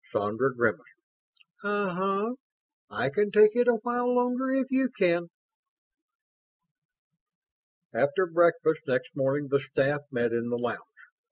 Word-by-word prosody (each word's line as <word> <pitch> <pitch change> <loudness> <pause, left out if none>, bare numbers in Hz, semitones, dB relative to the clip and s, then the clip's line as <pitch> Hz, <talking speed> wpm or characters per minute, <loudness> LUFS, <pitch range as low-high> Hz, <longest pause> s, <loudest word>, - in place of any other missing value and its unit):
Sandra 110 +7 0
grimaced. 120 -2 0 0.8
"Uh 205 -1 -1
huh. 195 +5 -1 0.5
I 135 - -2
can 205 +7 +1
take 215 +1 +5
it 245 0 +2
a 245 - +5
while 245 0 0
longer 245 +1 0
if 265 0 -1
you 260 0 +2
can." 175 -6 +1 2.7
After 145 +7 +1
breakfast 165 -2 +2
next 125 -1 -2
morning, 140 +1 -1
the 140 - +3
staff 145 +1 0
met 120 -3 -1
in 115 0 -2
the 120 - -1
lounge. 120 - -4
175 Hz, 125 wpm, -27 LUFS, -, 2.7 s, take